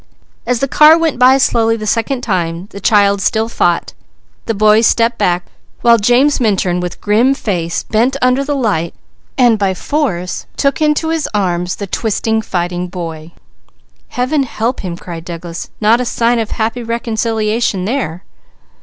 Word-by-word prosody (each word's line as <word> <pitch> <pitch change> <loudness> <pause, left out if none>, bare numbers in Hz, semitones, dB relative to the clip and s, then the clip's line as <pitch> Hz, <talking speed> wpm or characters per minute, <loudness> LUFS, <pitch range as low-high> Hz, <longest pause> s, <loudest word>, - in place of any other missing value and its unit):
As 245 -1 0
the 275 - +1
car 305 +4 +6
went 325 -6 -1
by 255 +2 +6
slowly 225 -3 +2
the 215 - -6
second 240 +4 -1
time, 175 -6 -2
the 200 - -8
child 200 -1 +3
still 220 +3 +1
fought, 175 -7 0 0.5
the 225 - -1
boy 215 +2 +4
stepped 230 +1 +2
back, 180 -3 +1 0.4
while 235 -1 +5
James 245 +7 +3
Minturn 195 -6 +1
with 180 -1 -5
grim 230 +6 +2
face, 175 -9 -2
bent 240 +5 0
under 255 +1 +2
the 290 +1 -2
light 200 -11 -1 0.4
and 240 -4 +4
by 195 -2 0
force 185 - -2
took 275 +2 0
into 305 +1 +1
his 325 -2 -1
arms 180 -3 -1
the 200 - -5
twisting, 220 +2 -1
fighting 175 -2 -3
boy. 165 -3 -7 0.8
"Heaven 255 +4 -1
help 240 -1 -2
him!" 175 -3 -5
cried 170 -2 -8
Douglas. 170 0 -7
"Not 225 +3 +3
a - - -2
sign 235 0 +1
of 225 -1 -2
happy 225 +2 -2
reconciliation 225 -3 -1
there!" 200 - -3
220 Hz, 160 wpm, -15 LUFS, 180-245 Hz, 0.8 s, car